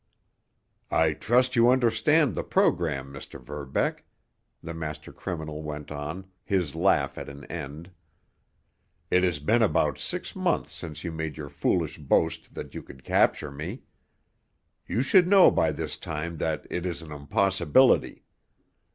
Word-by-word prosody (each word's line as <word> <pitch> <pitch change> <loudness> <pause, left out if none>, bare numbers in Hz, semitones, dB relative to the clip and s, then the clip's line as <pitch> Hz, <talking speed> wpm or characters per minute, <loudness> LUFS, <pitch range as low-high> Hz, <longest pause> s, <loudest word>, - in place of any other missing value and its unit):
"I 80 -1 +3
trust 125 +8 +2
you 120 0 +6
understand 130 +3 +3
the - - -3
program, 70 -5 +1
Mr. 70 - -9
Verbeck," 70 -2 -3 0.6
the 85 - -6
master 75 -2 -6
criminal 80 -4 -5
went 75 -1 -6
on, 75 +6 -5 0.2
his 90 -8 0
laugh - - +1
at - - -7
an 70 0 -10
end. 80 +2 -7 1.2
"It 90 - +4
has 90 -4 +2
been 110 +12 +2
about 75 - +2
six - - -3
months - - 0
since 75 -2 -7
you 85 - -3
made 80 -1 -4
your 75 -2 -6
foolish 75 +2 -1
boast 80 +3 0
that - - -7
you - - -6
could 65 - -14
capture - - +2
me. 80 - -6 1.0
You 120 - 0
should 175 +5 +5
know 195 0 +7
by 80 - +2
this 80 +1 -4
time 80 +1 -5
that 80 0 -2
it 90 - -2
is 85 -1 -4
an 80 - -11
impossibility. 90 - +2
80 Hz, 145 wpm, -27 LUFS, 75-95 Hz, 1.2 s, know